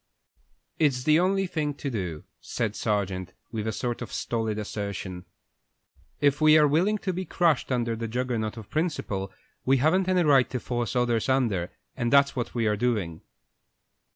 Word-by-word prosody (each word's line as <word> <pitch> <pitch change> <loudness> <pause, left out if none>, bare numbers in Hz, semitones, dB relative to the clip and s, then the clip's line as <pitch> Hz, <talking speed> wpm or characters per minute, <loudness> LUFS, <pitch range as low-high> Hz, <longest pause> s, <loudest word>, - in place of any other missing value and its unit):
"It's 135 -5 +2
the 155 +3 +4
only 195 +2 +2
thing 150 -5 -2
to 140 -1 -4
do," 90 -9 -4 0.2
said 110 -3 -3
Sargent, 95 -4 -2 0.2
with 110 -2 -3
a - - 0
sort 120 +3 -3
of 120 - -6
stolid 110 -2 -2
assertion. 100 -3 -5 0.9
"If 145 +1 +2
we 155 0 +7
are 150 -1 +6
willing 180 +9 +2
to 190 -2 -3
be 185 +2 -3
crushed 170 -7 +1
under 120 -2 0
the 115 +1 -4
Juggernaut 120 -2 -2
of 110 -3 -10
principle, 130 - -2 0.3
we 135 +1 +3
haven't 180 +8 +2
any 180 -1 +3
right 140 -5 +4
to 125 - -3
force 120 0 -3
others 120 -1 +1
under, 115 -10 +1 0.3
and 120 0 -1
that's 140 0 +5
what 125 -1 -3
we 115 -2 +1
are 105 -1 +2
doing." 105 -8 -1
120 Hz, 170 wpm, -26 LUFS, 110-150 Hz, 0.9 s, we